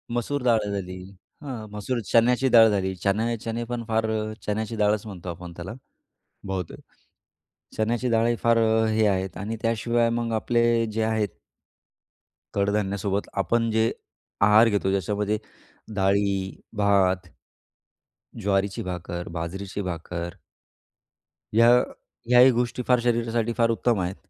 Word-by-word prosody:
मसूर 135 Hz, +3 st, -2 dB
डाळ 115 Hz, -3 st, +4 dB
झाली. 95 Hz, -2 st, -4 dB, 0.4 s
अ, 145 Hz, -, -10 dB, 0.2 s
मसूर 110 Hz, +4 st, -3 dB
चण्याची 125 Hz, +3 st, +4 dB
डाळ 115 Hz, -2 st, +8 dB
झाली, 95 Hz, -2 st, 0 dB
चणे 110 Hz, +5 st, 0 dB
चणे 115 Hz, +2 st, -4 dB
पण 120 Hz, 0 st, -4 dB
फार 110 Hz, 0 st, +1 dB, 0.4 s
चण्याची 110 Hz, +2 st, -2 dB
डाळच, 105 Hz, 0 st, +1 dB
म्हणतो 95 Hz, -4 st, -8 dB
आपण 85 Hz, 0 st, -8 dB
त्याला 90 Hz, +5 st, -6 dB, 0.7 s
बहुतेक. 95 Hz, -3 st, -4 dB, 1.0 s
चण्याची 120 Hz, +3 st, 0 dB
डाळही 115 Hz, +1 st, +2 dB
फार 115 Hz, 0 st, +4 dB, 0.3 s
हे 110 Hz, 0 st, +2 dB
आहेत 95 Hz, -1 st, -1 dB
आणि 105 Hz, +4 st, -4 dB
त्याशिवाय 115 Hz, +1 st, +1 dB
मग 115 Hz, 0 st, -1 dB
आपले 115 Hz, +1 st, +1 dB, 0.3 s
जे 110 Hz, +1 st, -2 dB
आहेत 110 Hz, -2 st, 0 dB, 1.3 s
कडधान्यासोबत 100 Hz, 0 st, 0 dB
आपण 115 Hz, +3 st, +1 dB
जे 110 Hz, +1 st, +2 dB, 0.5 s
आहार 105 Hz, +3 st, +6 dB
घेतो 100 Hz, -2 st, 0 dB
ज्याच्यामध्ये 105 Hz, +2 st, 0 dB, 0.6 s
डाळी, 100 Hz, -1 st, +1 dB, 0.2 s
भात, 95 Hz, -3 st, +2 dB, 1.2 s
ज्वारीची 100 Hz, 0 st, 0 dB
भाकर, 90 Hz, -1 st, -5 dB
बाजरीची 95 Hz, +4 st, -5 dB
भाकर, 85 Hz, +1 st, -5 dB, 1.2 s
ह्या 115 Hz, +2 st, +6 dB, 0.6 s
ह्याही 125 Hz, +1 st, +7 dB
गोष्टी 125 Hz, +1 st, -1 dB
फार 125 Hz, -1 st, +4 dB
शरीरासाठी 115 Hz, -1 st, 0 dB
फार 115 Hz, -1 st, +3 dB
उत्तम 115 Hz, -1 st, +1 dB
आहेत. 90 Hz, +2 st, -2 dB
105 Hz, 120 wpm, -25 LUFS, 95-115 Hz, 1.3 s, डाळ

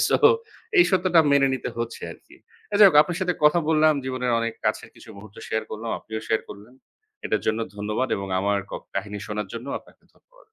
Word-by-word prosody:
So, -, -, +4 dB, 0.6 s
এই 350 Hz, -, +8 dB
সত্যটা 185 Hz, -3 st, +4 dB
মেনে 140 Hz, -1 st, +4 dB
নিতে 130 Hz, -, -4 dB
হচ্ছে 115 Hz, 0 st, -4 dB
আরকি। -, -, -19 dB, 0.4 s
যাই 205 Hz, -, +11 dB
হোক, 180 Hz, -, -2 dB
আপনার 175 Hz, +1 st, -5 dB
সাথে 180 Hz, -1 st, 0 dB
কথা 150 Hz, +3 st, +5 dB
বললাম। 155 Hz, -1 st, +4 dB
জীবনের 130 Hz, -2 st, -2 dB
অনেক 115 Hz, 0 st, -2 dB
কাছের 110 Hz, 0 st, -1 dB
কিছু -, -, -16 dB
মুহূর্ত 100 Hz, 0 st, -13 dB
শেয়ার 110 Hz, -, -1 dB
করলাম। 110 Hz, +1 st, -5 dB
আপনিও 110 Hz, 0 st, -6 dB
শেয়ার 110 Hz, -, +2 dB
করলেন। 105 Hz, +5 st, -12 dB, 0.5 s
এটার 110 Hz, -, -1 dB
জন্য 110 Hz, +1 st, +1 dB, 0.2 s
ধন্যবাদ 105 Hz, +5 st, -2 dB
এবং 100 Hz, 0 st, -5 dB
আমার 100 Hz, +1 st, +1 dB
ক -, -, -12 dB, 0.2 s
কাহিনী 100 Hz, +1 st, -4 dB
শোনার 105 Hz, -2 st, -4 dB
জন্যও 120 Hz, +4 st, -5 dB
আপনাকে -, -, -23 dB
ধন্যবাদ। -, -, -26 dB
115 Hz, 195 wpm, -24 LUFS, 105-155 Hz, 0.6 s, যাই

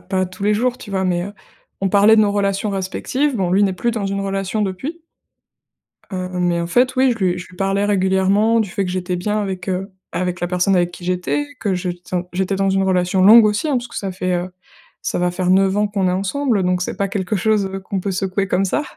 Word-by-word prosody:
pas 185 Hz, 0 st, -1 dB
tous 185 Hz, +2 st, -11 dB
les 210 Hz, +1 st, +3 dB
jours, 250 Hz, +3 st, 0 dB
tu 205 Hz, -, -10 dB
vois? 190 Hz, -1 st, -1 dB
Mais, 175 Hz, -1 st, 0 dB
heu, 200 Hz, -, -7 dB, 0.5 s
on 195 Hz, -, +2 dB
parlait 205 Hz, +2 st, +6 dB
de -, -, +6 dB
nos 205 Hz, -1 st, +1 dB
relations 200 Hz, 0 st, 0 dB
respectives. 235 Hz, +8 st, -1 dB
Bon, 185 Hz, -3 st, 0 dB
lui 195 Hz, +3 st, +3 dB
n'est 195 Hz, -, +1 dB
plus 235 Hz, +6 st, 0 dB
dans 215 Hz, -4 st, -2 dB
une 195 Hz, 0 st, -2 dB
relation 195 Hz, +2 st, -2 dB
depuis. 265 Hz, -, -4 dB, 1.1 s
Heu, 185 Hz, -2 st, -3 dB
mais 175 Hz, -1 st, +1 dB
en 170 Hz, -, -2 dB
fait 250 Hz, +8 st, +2 dB
oui, 260 Hz, -1 st, +4 dB
je 230 Hz, -, -6 dB
lui 180 Hz, 0 st, +1 dB
je 175 Hz, -, -9 dB
lui 180 Hz, -, -16 dB
parlais 195 Hz, +1 st, 0 dB
régulièrement 200 Hz, +3 st, +2 dB
du 210 Hz, -, -1 dB
fait 195 Hz, +2 st, -1 dB
que 180 Hz, -, -3 dB
j'étais 180 Hz, -1 st, -2 dB
bien 210 Hz, +4 st, -1 dB
avec, 190 Hz, -2 st, -4 dB
heu, 190 Hz, +2 st, -2 dB, 0.2 s
avec 180 Hz, 0 st, -2 dB
la 175 Hz, -, 0 dB
personne 180 Hz, +2 st, +1 dB
avec 175 Hz, 0 st, +2 dB
qui 175 Hz, -, -11 dB
j'étais. 180 Hz, +11 st, -1 dB
Que 200 Hz, -4 st, 0 dB
je 180 Hz, 0 st, -2 dB
ten 175 Hz, 0 st, -4 dB
j'étais 190 Hz, +2 st, -1 dB
dans 195 Hz, 0 st, +1 dB
une 195 Hz, 0 st, +2 dB
relation 185 Hz, 0 st, +1 dB
longue 220 Hz, +4 st, +9 dB
aussi, 210 Hz, +9 st, +1 dB
hein. 280 Hz, -, +1 dB
Parce 245 Hz, 0 st, -3 dB
que -, -, -11 dB
ça 195 Hz, -2 st, -3 dB
fait, 185 Hz, 0 st, -1 dB
heu, 175 Hz, +1 st, -2 dB, 0.5 s
ça -, -, -2 dB
va 180 Hz, 0 st, +1 dB
faire 180 Hz, 0 st, -1 dB
9 190 Hz, +1 st, +3 dB
ans 210 Hz, 0 st, +2 dB
qu'on 195 Hz, -2 st, 0 dB
est -, -, +2 dB
ensemble, 205 Hz, +3 st, 0 dB
donc 180 Hz, 0 st, +1 dB
c'est -, -, -4 dB
pas 200 Hz, 0 st, -1 dB
quelque 195 Hz, +1 st, -2 dB
chose, 210 Hz, +1 st, +1 dB
heu, 195 Hz, 0 st, -5 dB
qu'on 190 Hz, +1 st, -4 dB
peut 195 Hz, -, -3 dB
secouer 195 Hz, +1 st, -1 dB
comme 195 Hz, +1 st, +1 dB
ça 245 Hz, +10 st, 0 dB
195 Hz, 255 wpm, -19 LUFS, 180-210 Hz, 1.1 s, longue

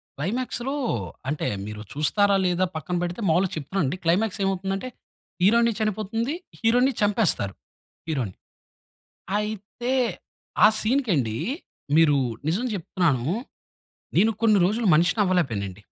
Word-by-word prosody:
క్లైమాక్స్‌లో 245 Hz, -, -2 dB, 0.5 s
అంటే 150 Hz, +1 st, -2 dB, 0.2 s
మీరు 105 Hz, 0 st, -7 dB
చూస్తారా? 200 Hz, +7 st, +3 dB
లేదా 180 Hz, +1 st, +2 dB
పక్కన 160 Hz, +3 st, -3 dB
పెడితే, 175 Hz, +5 st, -4 dB
మాములుగా 180 Hz, +3 st, +2 dB
చెప్తున్నా 155 Hz, +6 st, -2 dB
అండి. 135 Hz, +7 st, -2 dB
క్లైమాక్స్ 185 Hz, +6 st, +1 dB
ఏమవుతుంది 195 Hz, 0 st, -1 dB
అంటే 255 Hz, +6 st, -6 dB, 0.5 s
హీరోయిన్ 235 Hz, +4 st, +5 dB
చనిపోతుంది. 215 Hz, +5 st, -1 dB, 0.3 s
హీరోని 245 Hz, +3 st, +3 dB
చంపేస్తారు 205 Hz, -, +2 dB, 0.5 s
హీరోని. 130 Hz, -, -2 dB, 1.0 s
అయితే 215 Hz, +4 st, -4 dB, 0.7 s
ఆ -, -, +11 dB
సీన్‌కి 250 Hz, +1 st, +1 dB
అండి 115 Hz, -6 st, -1 dB, 0.6 s
మీరు 155 Hz, -3 st, +5 dB, 0.3 s
నిజం 190 Hz, +10 st, 0 dB
చెప్తున్నాను. 165 Hz, -8 st, 0 dB, 0.9 s
నేను 215 Hz, +5 st, +5 dB
కొన్ని 215 Hz, -3 st, +5 dB
రోజులు 220 Hz, +5 st, 0 dB
మనిషిని 175 Hz, +7 st, +2 dB
అవ్వలేక 180 Hz, -5 st, +2 dB
పోయానండి. 100 Hz, -2 st, -5 dB
190 Hz, 115 wpm, -25 LUFS, 155-220 Hz, 1.0 s, ఆ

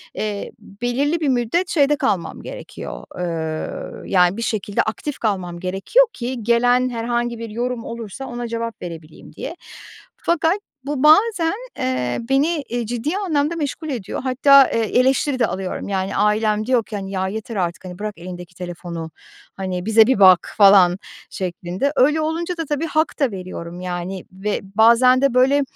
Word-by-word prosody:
eee, 210 Hz, -1 st, -3 dB
belirli 245 Hz, +10 st, -2 dB
bir 305 Hz, -3 st, 0 dB
müddet 255 Hz, +9 st, 0 dB
şeyde 295 Hz, -2 st, +3 dB
kalmam 200 Hz, -, -1 dB
gerekiyor. -, -, -8 dB, 0.2 s
Iıı, 160 Hz, -3 st, -4 dB
yani, 180 Hz, +1 st, +3 dB
bir -, -, -4 dB
şekilde 210 Hz, -3 st, -1 dB
aktif 265 Hz, +6 st, -4 dB
kalmam 185 Hz, -6 st, -2 dB
gerekiyor 195 Hz, -, +2 dB
ki 245 Hz, -1 st, -4 dB
gelen 245 Hz, +2 st, +3 dB
herhangi 240 Hz, 0 st, -2 dB
bir 230 Hz, 0 st, -6 dB
yorum 240 Hz, +2 st, -3 dB
olursa 230 Hz, +2 st, -7 dB
ona 240 Hz, -1 st, -5 dB
cevap 230 Hz, 0 st, -4 dB
verebileyim 165 Hz, -3 st, -9 dB
diye. -, -, -6 dB, 0.6 s
Fakat 340 Hz, +2 st, +1 dB, 0.3 s
bu 285 Hz, -1 st, -2 dB
bazen, 335 Hz, +2 st, +5 dB, 0.2 s
eee, 125 Hz, -1 st, -1 dB
beni, 295 Hz, +3 st, +2 dB
e, 240 Hz, 0 st, -2 dB
ciddi 245 Hz, -, -2 dB
anlamda 325 Hz, -5 st, 0 dB
meşgul 310 Hz, 0 st, -4 dB
ediyor. 235 Hz, -9 st, -4 dB
Hatta, 270 Hz, +1 st, +6 dB
eee, -, -, +1 dB, 0.2 s
eleştiri 265 Hz, +1 st, +2 dB
de 230 Hz, -, +3 dB
alıyorum. 190 Hz, -1 st, -4 dB
Yani, 190 Hz, -1 st, -2 dB
ailem 215 Hz, 0 st, +2 dB
diyor 250 Hz, -1 st, +2 dB
ki, 215 Hz, -, -7 dB
hani, 195 Hz, -1 st, -5 dB
"Ya, 190 Hz, -1 st, -1 dB
yeter 220 Hz, +3 st, -5 dB
artık, 175 Hz, -1 st, -2 dB
hani, 180 Hz, 0 st, -8 dB
bırak 210 Hz, 0 st, -3 dB
elindeki 180 Hz, 0 st, -9 dB
telefonu, 170 Hz, -2 st, -6 dB, 0.4 s
hani, 185 Hz, -2 st, -4 dB
bize 220 Hz, 0 st, +6 dB
bir 260 Hz, -5 st, +2 dB
bak." 185 Hz, -3 st, +6 dB
falan 195 Hz, -3 st, +7 dB, 0.3 s
şeklinde. 185 Hz, +7 st, -3 dB
Öyle 295 Hz, +4 st, +3 dB
olunca 335 Hz, +3 st, -2 dB
da 330 Hz, -, -2 dB
tabii 295 Hz, +2 st, -2 dB
hak 315 Hz, 0 st, 0 dB
da 275 Hz, -5 st, +2 dB
veriyorum, 180 Hz, -2 st, -7 dB
yani, 180 Hz, +1 st, -4 dB
ve 195 Hz, +3 st, -2 dB, 0.2 s
bazen 235 Hz, +4 st, +6 dB
de, 275 Hz, -3 st, +3 dB
böyle, 265 Hz, +3 st, +4 dB
230 Hz, 160 wpm, -21 LUFS, 185-270 Hz, 0.6 s, falan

